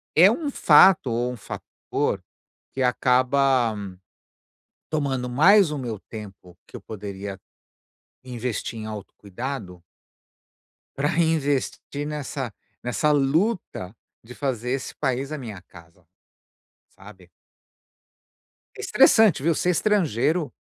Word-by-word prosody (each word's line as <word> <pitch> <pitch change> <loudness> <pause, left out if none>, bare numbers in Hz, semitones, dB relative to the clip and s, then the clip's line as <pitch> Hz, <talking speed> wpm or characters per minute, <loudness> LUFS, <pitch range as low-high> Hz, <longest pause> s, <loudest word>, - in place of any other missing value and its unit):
é 180 +5 +8
um 295 +3 -2
fato 160 - +6
ou 120 +2 -1
um - - -9
fator - - -4 0.5
que 135 - -1
acaba 130 -1 +2 1.2
tomando 135 -5 -1
mais 180 +6 +5
o 150 - -3
meu 115 -4 -4
tempo 100 -5 -10
que - - -14
eu - - -13
poderia 100 -2 -7 0.8
investir 120 -2 -4
em 110 - -6
autocuidado 100 -1 -7 1.1
Para 145 +2 0
reinvestir 145 -3 -1
nessa 140 -5 -5 0.3
nessa 135 +5 +1
luta 145 - 0 0.3
de 125 +2 -11
fazer 125 -3 -2
esse 135 0 -3
país 135 +1 -2
a 155 - -3
minha 110 -8 -8
casa, 85 -1 -18 0.8
sabe? - - -16 1.5
É - - -13
estressante, 215 - +4
viu? 170 - +3
Ser 180 - 0
estrangeiro, 165 - +1
130 Hz, 105 wpm, -24 LUFS, 110-150 Hz, 1.5 s, é